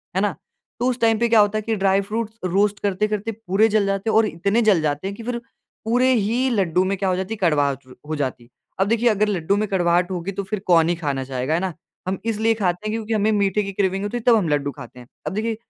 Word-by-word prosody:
है - - +2
ना, - - 0 0.4
तो 245 - +2
उस 255 0 -2
टाइम 225 -1 +3
पे 235 - +2
क्या 225 -1 +5
होता 205 +1 +3
है 215 - -1
कि 225 +1 -1
ड्राई 195 -1 +2
फ्रूट्स 220 +2 -4
रोस्ट 200 +3 +1
करते-करते 210 +2 -1
पूरे 215 0 +1
जल 210 -2 +3
जाते 195 +2 -1
और 220 0 +4
इतने 200 +5 0
जल 190 -6 +5
जाते 155 +6 -2
कि 225 +3 -9
फिर 240 0 -2 0.5
पूरे 250 +3 +3
ही 235 +4 +1
लड्डू 185 -6 +1
में 190 +1 0
क्या 190 0 0
हो 185 - +1
जाती 190 +4 -3
कड़वाहट 145 - +1 0.2
हो 155 - -1
जाती। 130 -4 -4 0.3
अब 190 - +2
देखिए 230 +2 +2
अगर 215 -1 +2
लड्डू 195 -2 0
में 215 +1 0
कड़वाहट 180 -1 +2
होगी 180 +1 -3
तो 200 +1 -4
फिर 195 +2 -4
कौन 165 -2 +5
ही 175 - +1
खाना 145 -5 -2
चाहेगा, 130 +2 -2
है 165 - +2
ना, 185 -2 -2 0.3
हम 190 +1 -1
इसलिए 225 0 +1
खाते 185 -3 -2
हैं - - -1
क्योंकि 225 0 -3
हमें 215 0 +2
मीठे 205 0 +1
की 200 - -4
क्रेविंग 195 0 0
होती 205 +4 -2
है, 235 - -6
तब 240 - +7
हम 205 -6 +1
लड्डू 145 -1 0
खाते 125 -3 -12
हैं, 120 - -13 0.2
अब 155 - -2
देखिए, 220 +2 -1
200 Hz, 250 wpm, -22 LUFS, 175-220 Hz, 0.5 s, तब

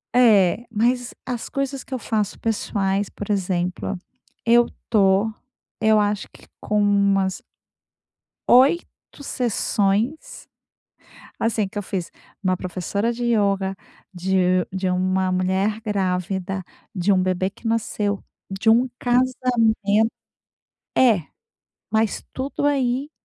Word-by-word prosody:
É. 220 -3 +5
Mas 240 +3 0
as 245 -3 -4
coisas 275 -1 -3
que 265 - -10
eu 255 - -2
faço 210 -3 -2
pessoais, 200 -3 -1
por 205 0 -6
exemplo. 185 0 -1 0.5
Eu 235 +1 +5 0.2
tô 200 0 +3 0.5
eu 220 -1 +5
acho 205 -1 -1
que - - -18
com 210 0 +1
umas 200 -2 +2 1.1
8 270 +7 +6 0.4
sessões, 230 +1 -1 0.9
assim, 225 -2 0
que - - -20
eu - - -2
fiz. 185 -3 -4 0.3
Uma 185 -1 +1
professora 190 +5 -2
de 240 +1 -4
ioga, 200 -4 +1 0.4
de 185 0 +1
de 190 0 -1
uma 185 +1 +1
mulher 190 +4 0
grávida, 190 -2 -2 0.3
de 195 +1 +2
um 185 - +3
bebê 185 +1 0
que 230 - -12
nasceu, 210 -3 -1 0.3
de 195 +3 +1
um 240 +3 +4
casamento 235 -4 +2 0.9
É, 220 - +4 0.6
mas 220 -1 +1
tudo 275 +2 -2
aí 270 0 0
205 Hz, 115 wpm, -22 LUFS, 190-235 Hz, 1.1 s, 8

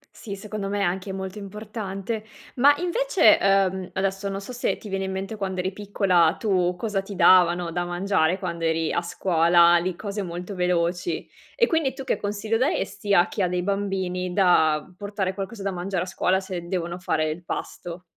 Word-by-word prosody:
Sì, 200 -3 -7
secondo 200 0 -5
me 205 0 -1
è - - +2
anche 190 +2 -2
molto 190 +1 -5
importante. 210 +1 -5 0.3
Ma 285 +4 +6
invece, 360 - +4
uhm, 190 -1 +2
adesso 195 +1 -1
non 195 0 -4
so 200 - -8
se 245 - -1
ti 215 - -11
viene 195 -1 -2
in 190 - -3
mente 195 +3 -4
quando 190 -2 -3
eri 185 +1 -1
piccola 195 -5 +2
tu, 180 -4 +1
cosa 205 0 -2
ti 195 +1 -9
davano 175 -2 +5
da 175 +1 -1
mangiare 175 -1 +1
quando 170 -3 -4
eri 160 -1 0
a - - +1
scuola, 170 0 +4
lì, 175 +1 -1
cose 205 +2 -4
molto 180 +1 -6
veloci, 180 - -1 0.3
e 470 - +4
quindi 320 - 0
tu 270 - -6
che 265 - 0
consiglio 210 +2 -1
daresti 210 -5 0
a 175 -1 +5
chi 205 - -4
ha 185 - +3
dei 180 0 -1
bambini 190 -2 -2
da 160 -5 +3
portare 200 -1 -3
qualcosa 195 +2 -6
da 195 - -1
mangiare 180 0 -2
a - - -5
scuola 185 0 +1
se 185 -3 -6
devono 175 -1 -3
fare 155 -3 0
il 170 +3 -7
pasto? 175 0 -6
190 Hz, 190 wpm, -24 LUFS, 175-205 Hz, 0.3 s, Ma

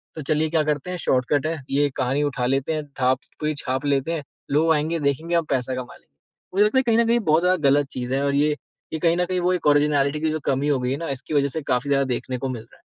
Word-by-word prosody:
तो 155 - -5
चलिए 155 0 +1
क्या 160 -1 +2
करते 150 +3 -2
हैं 180 - -3
शॉर्टकट 135 -1 +1
है। 160 -1 -2
ये 145 +1 +2
कहानी 135 +3 0
उठा 130 -4 -1
लेते 135 +4 0
हैं, 155 -1 -3 0.2
थाप 130 +1 +3 0.2
कोई 155 0 -1
छाप 130 0 -2
लेते 140 +3 +1
हैं। 155 -3 -3 0.3
लोग 160 +3 +4
आएँगे 160 +2 0
देखेंगे 150 +4 0
हम 170 -2 +2
पैसा 130 -1 0
कमा 125 -1 -7
लेंगे। - - -23 0.5
मुझे 205 +1 +5
लगता 220 +5 +1
है - - +1
कहीं 230 -2 +2
न 235 - +4
कहीं 235 +1 +3
बहुत 160 -6 +2
ज़्यादा 180 -6 +3
गलत 145 0 +3
चीज़ 125 0 -4
है। 140 - 0
और 140 0 +1
ये 150 +1 +3 0.4
ये 160 - -2
कहीं 170 +1 +2
न 180 - +1
कहीं 185 0 -1
वो 180 +1 +2
एक 170 -4 -1
ऑरिजिनैलिटी 145 0 +3
की 160 - +1
जो 155 - -2
कमी 135 +2 0
हो 140 -3 +2
गई 125 0 -1
है 135 - -1
ना 165 -1 -5
इसकी 135 +3 -5
वज़ह 140 -1 +3
से - - -1
काफ़ी 130 +3 -1
ज़्यादा 140 -1 +3
देखने 130 -1 -4
को 130 +1 -3
मिल 120 -3 -4
रहा 115 - -22
है। - - -30
145 Hz, 285 wpm, -23 LUFS, 135-160 Hz, 0.5 s, मुझे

